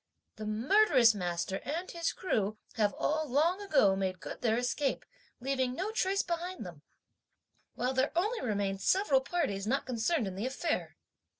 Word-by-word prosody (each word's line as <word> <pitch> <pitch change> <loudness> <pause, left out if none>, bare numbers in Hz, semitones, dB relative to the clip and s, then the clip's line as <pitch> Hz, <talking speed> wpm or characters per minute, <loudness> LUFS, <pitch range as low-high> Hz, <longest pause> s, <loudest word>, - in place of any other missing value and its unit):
The 215 0 -5
murderous 255 - +5
master 180 -1 -2
and 330 +7 -4
his 335 -1 -1
crew 215 - -1 0.2
have 210 -3 +2
all 310 0 -1
long 330 +9 +2
ago 270 - +4
made 190 -1 -2
good - - -8
their 225 -2 +2
escape, 250 +3 -1 0.3
leaving 260 -1 -1
no 385 +7 -2
trace 395 -2 +1
behind 345 - -4
them, 170 -5 -10 0.9
while 250 +2 -1
there 260 +2 +1
only 425 +8 0
remain 200 -4 -1
several 295 - +3
parties 210 - -2
not 270 +4 0
concerned 250 +3 0
in 190 - -4
the 200 +6 -3
affair. 300 +5 -2
260 Hz, 160 wpm, -31 LUFS, 210-340 Hz, 0.9 s, murderous